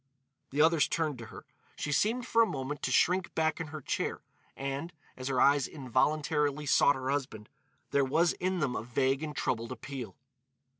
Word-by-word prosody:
The 145 +3 +3
others 160 -1 +4
turned 155 -6 -1
to 115 - -8
her. - - -11 0.3
She 145 - -3
seemed, 230 - +1
for 230 -2 +3
a 225 - +5
moment, 140 -1 -4
to - - -1
shrink 180 0 +2
back 160 0 +1
in 165 - -4
her 155 -1 -7
chair, - - -2 0.3
and, 140 +5 -4 0.2
as 130 0 -6
her 130 -2 0
eyes 140 0 +4
involuntarily 150 +2 0
sought 145 +1 +5
her 130 0 -2
husband, 130 -7 -3 0.4
there 140 - +3
was 160 +6 +2
in 185 0 -2
them 130 -4 0
a - - -2
vague 130 +4 0
and 150 -2 -5
troubled 115 -4 -2
appeal. 125 -7 -7
145 Hz, 185 wpm, -30 LUFS, 130-160 Hz, 0.4 s, a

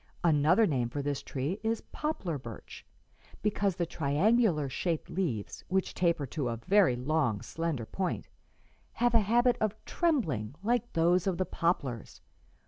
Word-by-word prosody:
Another 165 +6 +4
name 125 - 0
for 140 +3 -4
this 145 -1 -2
tree 145 +9 -3
is 225 0 -1
poplar 295 - -2
birch, 115 -3 -10 0.6
because 200 -2 +1
the 175 - 0
triangular 165 - +2
shaped 160 +5 -2
leaves, 135 - -3
which 190 0 0
taper 170 -5 +1
to 135 -1 -3
a 115 - -3
very 185 - +3
long, 130 -4 0
slender 165 -8 -3
point, 185 - -3 0.7
have 240 0 +1
a 230 - +6
habit 240 +4 +3
of 215 -1 +1
trembling 155 - 0
like 240 +2 0
those 170 +3 +3
of 185 -3 0
the 185 - 0
poplars. 145 - -2
170 Hz, 145 wpm, -30 LUFS, 140-205 Hz, 0.7 s, a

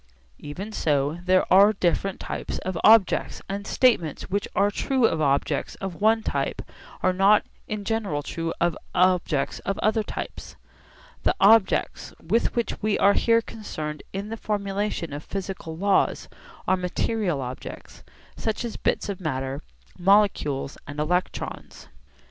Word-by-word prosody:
Even 190 +9 -7
so, 150 -3 0
there 185 0 +4
are 200 +3 +7
different 190 0 0
types - - -5
of 185 -1 -4
objects, 220 -3 +4
and 200 +1 -5
statements 185 - +1
which 200 +1 -1
are 200 +2 +3
true 260 +2 +1
of 160 -7 +1
objects 140 -1 0
of 195 -1 -7
one 220 +1 +3
type - - -2 0.4
are 185 - +3
not 195 +3 +4 0.2
in 210 -1 -4
general 200 -10 -1
true 165 +2 -3
of 170 -1 +1 0.2
objects 180 -6 +2
of 195 - -3
other 220 +1 +1
types. - - -7 0.7
The - - +2
objects 210 0 +3
with 215 +9 0
which 235 -1 -2
we 215 -1 +1
are 200 - +5
here 230 +1 +3
concerned 155 -10 -6
in 200 +2 -5
the 225 - -5
formulation 200 -6 -2
of 145 +2 -6
physical 190 -4 -6
laws 200 +2 +1 0.4
are 190 - +4
material 180 -1 -1
objects, 125 -1 -8 0.3
such 220 +2 -2
as 230 - -5
bits - - 0
of 200 -2 -5
matter, 135 -3 -3 0.4
molecules 180 -8 +2
and 145 +1 -7
electrons. 180 +4 -3
195 Hz, 145 wpm, -25 LUFS, 160-210 Hz, 0.7 s, are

